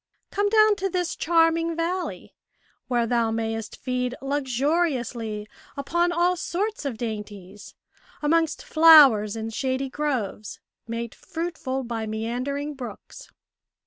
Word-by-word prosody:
Come 410 0 +1
down 430 -1 +5
to 390 -1 -1
this 355 -2 -2
charming 330 0 +2
valley, 345 +2 -3 0.5
where 240 -2 +1
thou 230 -1 +1
mayest 225 -1 -3
feed 250 -1 -2
luxuriously 260 -5 -1 0.3
upon 345 +5 +1
all 350 +1 +2
sorts 385 +1 -3
of 260 -5 -3
dainties, 210 -3 -7 0.4
amongst 325 +1 +1
flowers 285 -11 +7
in 225 0 -4
shady 260 +3 -2
groves, 250 -9 -3 0.3
made 230 0 -4
fruitful 320 -6 -4
by 230 -2 -4
meandering 250 +7 -3
brooks." 255 -4 -10
270 Hz, 110 wpm, -25 LUFS, 230-330 Hz, 0.5 s, flowers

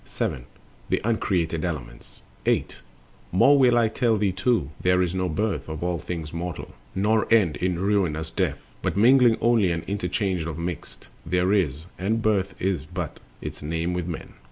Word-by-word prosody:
7. - - -3 0.4
The - - +2
uncreated 90 -7 0
elements. 65 -9 -6 0.2
Birth - - -14
and - - -1
Death. - - -28
8. - - -16 0.5
More 140 +10 +6
will 125 -2 +5
I 115 -1 +4
tell 115 0 +1
thee 100 -2 +1
too: 95 - 0
there 90 0 +3
is 90 -1 +1
no 95 -1 -1
birth 100 +1 -2
Of 80 +1 -5
all 90 -1 -1
things 80 -2 -5
mortal, 85 -1 -5 0.2
nor 110 +4 +1
end 95 -10 +4
in 90 +1 0
ruinous 90 -5 0
death; - - 0 0.2
But - - -1
mingling 120 +1 +6
only 115 -5 +3
and 85 -1 -2
interchange 95 -2 -1
of 80 -2 -5
mixed 85 0 -6 0.2
There 90 +3 +1
is, 80 -6 0
and 105 +5 0
birth 100 -3 +1
is 90 -6 -1
but 90 -2 -5 0.2
its - - -6
name 80 +3 -2
with 90 -1 -2
men. 85 - -6
90 Hz, 180 wpm, -25 LUFS, 85-105 Hz, 0.5 s, More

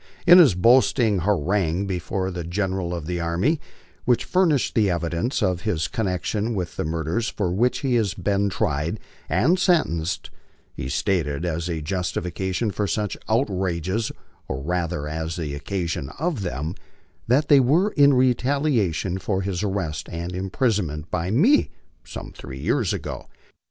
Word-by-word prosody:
In 175 +1 +9
his 140 - +6
boasting 115 0 +4
harangue 95 0 +1
before 95 0 -2
the 90 -1 -4
Gen 95 +3 -1
eral 95 -2 -2
of 85 -3 -4
the 90 +1 -2
Army, 90 - 0 0.4
which 125 -2 +2
furnished 170 -8 +2
the 105 -3 +3
evidence 85 - -1
of 90 -3 0
his 90 -7 -1
connection 105 0 -2
with 90 -3 -3
the - - -2
mur 80 +1 -2
ders 110 +9 -1
for 95 -5 -2
which 120 +6 +1
he 135 -3 0
has 105 -5 +1
been 100 0 0
tried 80 +2 -1 0.3
and 170 - +3
sentenced, 95 - +1 0.4
he 65 - -5
stated 80 -1 0
as 85 0 -2
a 80 -3 -3
justification 95 +4 -2
for 105 +1 -1
such 105 0 -1
outrages, 95 - 0 0.4
or 65 0 -4
rather 85 -2 -2
as 80 +1 -3
the 80 -5 -4
occasion 85 -2 -3
of 155 - -1
them, 80 -2 -3 0.5
that 135 +5 +3
they 145 - +7
were 155 +11 +3
in 140 -2 +5
retaliation 125 - +1
for 95 0 -1
his 95 -2 -2
arrest 95 -8 -3
and 85 +2 -4
imprisonment 95 - -1
by 90 0 -1
me 200 - +4 0.3
some - - -8
three - - -9
years - - +1
ago. - - -5
95 Hz, 155 wpm, -23 LUFS, 85-115 Hz, 0.5 s, In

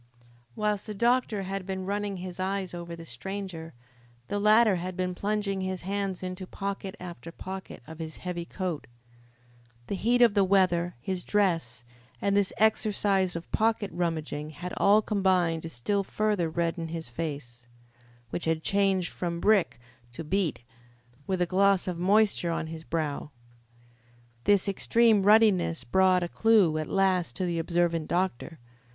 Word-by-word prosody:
Whilst 210 -1 -1
the 215 - -5
doctor 235 -2 +1
had 195 0 -4
been 190 -1 -3
running 200 0 -2
his 180 0 -7
eyes 190 -1 -2
over 170 -1 -6
the 165 0 -10
stranger, 165 +3 -6 0.5
the 205 - -1
latter 215 -1 +5
had 180 +1 -5
been 180 0 -1
plunging 200 0 -1
his 185 -1 -3
hands 195 0 -3
into 185 0 -5
pocket 195 0 -5
after 170 -2 -8
pocket 190 -4 -8
of 160 +1 -11
his 160 -1 -6
heavy 180 -1 -4
coat. 175 -3 -4 1.0
The - - -4
heat 240 +5 +3
of 230 -4 +5
the 200 -2 +4
weather, 185 -3 +2
his 185 +2 -3
dress, 165 - 0 0.3
and 200 0 +1
this 200 -2 +2
exercise 205 -4 +2
of 170 0 -7
pocket 220 -2 +1
rummaging 155 -3 -2
had 175 +3 -7
all 210 +2 +5
combined 185 -6 +1
to 165 - -6
still 195 - -1
further 205 -4 0
redden 165 0 -2
his 165 0 -5
face, 125 -3 -6 0.6
which 175 - -3
had 160 -1 0
changed 195 -3 +1
from 170 -1 -3
brick 200 - +2 0.3
to 160 - -6
beet, 170 -5 -1 0.6
with 185 -2 +1
a - - +1
gloss 195 +1 +3
of 175 -2 -3
moisture 200 -1 +3
on 165 -1 -1
his 160 0 -7
brow. 155 -3 -3 1.2
This 205 -2 +4
extreme 220 +2 +3
ruddiness 195 - +4
brought 185 +7 +3
a - - -1
clue 195 -6 +3
at 155 - -3
last 190 -3 +1
to 185 - -2
the 170 -1 -1
observant 170 -1 0
doctor. 175 -3 -2
185 Hz, 155 wpm, -28 LUFS, 170-200 Hz, 1.2 s, latter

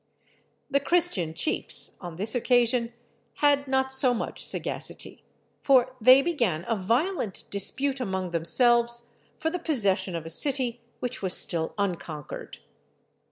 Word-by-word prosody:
The 280 - +3
Christian 280 - 0
chiefs, 310 - +4
on 175 -3 -8
this 205 +6 0
occasion, 240 -1 +1 0.4
had 285 -1 +1
not 265 0 0
so 260 -2 +3
much - - -4
sagacity, - - -4 0.4
for 255 -2 +2
they 255 +4 +7
began 235 - -1
a 230 - 0
violent 230 - -2
dispute 270 +7 0
among 190 -6 -4
themselves 235 +7 +2 0.3
for 320 +1 -2
the 360 - -4
possession 205 - 0
of 165 -1 -6
a - - -7
city 255 - +1 0.2
which 250 0 -3
was 190 -2 +1
still 165 -2 0
unconquered. 170 -7 -5
240 Hz, 130 wpm, -26 LUFS, 190-270 Hz, 0.4 s, they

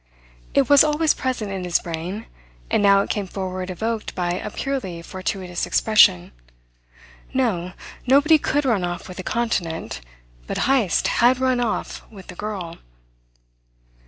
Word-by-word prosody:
It 275 -2 +4
was 285 -1 +7
always 305 +1 +2
present 245 -6 -3
in 190 -1 -4
his 175 -1 +2
brain, 175 +6 -5 0.5
and - - +3
now 200 -1 +5
it - - -4
came 205 -2 -2
forward 185 -1 -5
evoked 220 +4 -3
by 175 -1 -1
a 185 +4 -3
purely 205 -10 -4
fortuitous 185 -1 -4
expression. 150 - +4 1.0
No, 185 -9 0 0.3
nobody 290 +4 +5
could 290 0 0
run 225 -8 +1
off 175 0 -4
with 185 0 -9
a - - -4
continent; 180 - -2 0.5
but - - -3
Heyst 245 -9 +2
had 245 +2 +3
run 255 -1 +1
off 235 -3 -2
with 195 -4 -13
the 180 - -8
girl! 190 -5 -6
205 Hz, 145 wpm, -22 LUFS, 180-250 Hz, 1.0 s, was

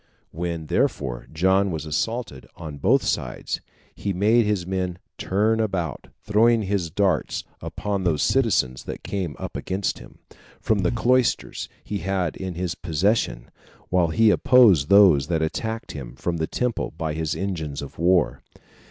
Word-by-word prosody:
When, 85 -1 -4
therefore, 65 -4 -1
John 95 +5 +2
was 80 -3 -4
assaulted 75 - -3
on 75 -3 -8
both - - +3
sides, - - -2 0.3
he 100 - -3
made 105 +5 +3
his 100 -4 0
men 90 -1 -2 0.2
turn 110 +4 +1
about, 95 -6 -2 0.2
throwing 110 +2 +3
his 95 -4 -1
darts 95 -2 0 0.2
upon 100 -2 -3
those 80 -5 +1
citizens 105 - +1
that - - -7
came 90 -8 -3
up - - -7
against 95 +1 -2
him, - - -14 0.4
from 110 -2 +1
the 90 -2 +2
cloisters 125 +1 +1
he 105 - -4
had 95 -2 -1
in 95 -2 -5
his 90 -1 -2
possession, 85 - -1 0.4
while 90 -2 +3
he 110 +6 +4
opposed 105 - +5
those 95 -9 +6
that 80 -2 0
attacked 110 +8 -3
him 65 -5 -8
from 85 +5 -2
the 80 -1 -1
temple 125 -2 -2
by 80 -2 -2
his 80 0 -2
engines 80 -5 -3
of 70 - -10
war. 90 0 +2
90 Hz, 150 wpm, -24 LUFS, 80-105 Hz, 0.4 s, those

